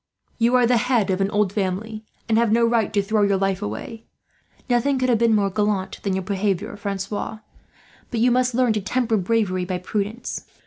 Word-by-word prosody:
You 235 +2 +3
are 250 -1 +5
the 240 0 +3
head 230 -5 +1
of 185 +1 0
an 195 - +1
old 205 -2 +1
family, 210 +3 -3 0.2
and 225 - +2
have 230 -2 +2
no 230 +1 +4
right 230 -2 +1
to 205 -2 +1
throw 215 +1 +1
your 200 -1 +3
life 195 -1 -1
away. 110 - -6 0.6
Nothing 255 +3 +2
could 255 0 0
have 235 -3 +3
been 230 -1 +4
more 200 -2 +1
gallant 205 -2 -1
than 195 -2 -1
your 190 - -2
behaviour, 200 +1 -2
Francois; 200 +1 -4 0.7
but 235 - -2
you 245 +2 +4
must 250 0 +1
learn 250 -3 +3
to 210 - -1
temper 230 +2 0
bravery 190 -2 0
by 180 0 -2
prudence. 210 +5 -4
215 Hz, 205 wpm, -22 LUFS, 195-235 Hz, 0.7 s, are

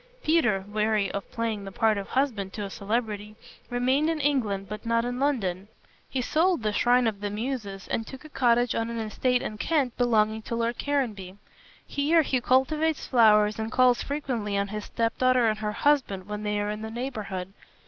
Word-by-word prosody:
Peter, 240 -12 +2
weary 210 -1 0
of 200 - -6
playing 225 -4 -2
the 195 - -7
part 220 +1 +2
of 200 -1 -4
husband 235 -8 0
to 210 - -5
a 200 - -6
celebrity, 210 0 -3 0.3
remained 260 +5 +1
in 325 -1 -1
England 230 -9 0
but 210 +1 -7
not 230 0 +1
in 245 +1 -3
London. 200 -10 -1 0.4
He 260 - -1
sold 330 0 +2
the 215 -1 0
"Shrine 245 +3 +3
of 210 -3 -1
the 205 - -2
Muses" 210 -3 -4
and 225 - -2
took 265 +2 -10
a - - -10
cottage 240 -3 +2
on 230 0 -1
an 235 - -4
estate 245 +3 0
in 215 - -5
Kent 280 -5 0
belonging 220 -3 +2
to 230 - -4
Lord 230 +1 -1
Caranby. 215 -10 -2 0.5
Here 315 +3 +2
he 260 -3 0
cultivates 300 +5 +1
flowers 215 -3 +4
and 220 0 -3
calls 250 -1 +4
frequently 245 -8 -2
on 200 0 -1
his 210 0 -5
step 230 -1 -1
daughter 255 -2 +4
and 215 -1 0
her 210 -1 -2
husband, 240 -8 +1
when 210 +1 -5
they 210 0 -1
are 205 0 -1
in 210 0 -5
the 220 - -5
neighborhood. 215 -6 -5
225 Hz, 195 wpm, -27 LUFS, 210-255 Hz, 0.5 s, flowers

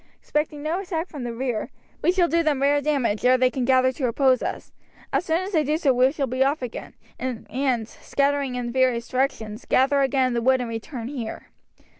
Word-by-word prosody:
Expecting 300 -1 -2
no 320 +4 -1
attack 355 -2 -3
from 290 - -7
the 240 - -3
rear, 235 -2 -3 0.3
we - - +4
shall 360 -2 +3
do 335 0 +2
them 295 -4 +1
rare 285 +1 +3
damage 265 -8 0
ere 255 +1 +5
they 255 0 +3
can 255 -1 -2
gather 260 0 +4
to 260 0 -2
oppose 255 +1 +3
us. - - -5 0.4
As - - +1
soon 325 +2 +1
as 380 +2 -5
they 320 -5 +2
do 300 +2 0
so 285 -5 +2
we 255 +2 +4
shall 285 -2 -1
be 260 +1 +1
off 275 0 0
again, 245 - -7 0.2
and, 255 -1 -2
scattering 280 0 -1
in 245 -1 -3
various 250 -2 +1
directions, 250 -4 -2
gather 275 +2 +3
again 265 -1 +2
in - - -3
the 235 - 0
wood 260 +2 +3
and 240 -2 -4
return 230 +1 -6
here." 245 -5 -6
265 Hz, 215 wpm, -24 LUFS, 250-290 Hz, 0.4 s, ere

